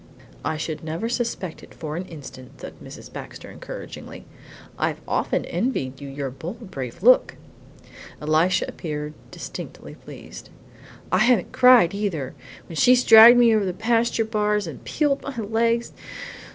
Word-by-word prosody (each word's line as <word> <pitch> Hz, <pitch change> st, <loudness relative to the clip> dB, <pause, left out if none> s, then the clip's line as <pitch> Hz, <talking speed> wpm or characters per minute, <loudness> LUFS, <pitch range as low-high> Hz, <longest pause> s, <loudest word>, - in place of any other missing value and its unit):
"I 160 Hz, -, -2 dB
should 155 Hz, 0 st, -5 dB
never 165 Hz, +8 st, -3 dB
suspect 230 Hz, -8 st, -3 dB
it -, -, -15 dB
for 155 Hz, -1 st, -6 dB
an 180 Hz, +3 st, -4 dB
instant," 135 Hz, -6 st, -12 dB
said -, -, -8 dB
Mrs. -, -, -11 dB
Baxter -, -, -9 dB
encouragingly. -, -, -9 dB, 0.5 s
"I've -, -, -2 dB
often -, -, -1 dB
envied 170 Hz, -, -2 dB
you 140 Hz, -, -7 dB
your 135 Hz, -1 st, -5 dB
bold, 185 Hz, -, -8 dB
brave 135 Hz, +4 st, -7 dB
look!" 255 Hz, +2 st, +5 dB, 0.8 s
Elisha 155 Hz, +4 st, +2 dB
appeared 150 Hz, -2 st, -5 dB, 0.2 s
distinctly -, -, -9 dB
pleased. -, -, -12 dB, 0.6 s
"I 185 Hz, -, +3 dB
haven't 230 Hz, -3 st, +3 dB
cried, 250 Hz, -8 st, +6 dB
either, 180 Hz, -10 st, -3 dB, 0.3 s
when 165 Hz, -, -8 dB
she's 250 Hz, +8 st, +5 dB
dragged 225 Hz, +2 st, +9 dB
me 235 Hz, -2 st, +5 dB
over 215 Hz, -, +2 dB
the 185 Hz, -2 st, -2 dB
pasture 230 Hz, +3 st, +1 dB
bars 210 Hz, -2 st, 0 dB
and 160 Hz, -, -9 dB
peeled 290 Hz, -2 st, 0 dB
my 275 Hz, -3 st, -7 dB
legs. 230 Hz, +2 st, 0 dB
195 Hz, 145 wpm, -23 LUFS, 155-230 Hz, 0.8 s, dragged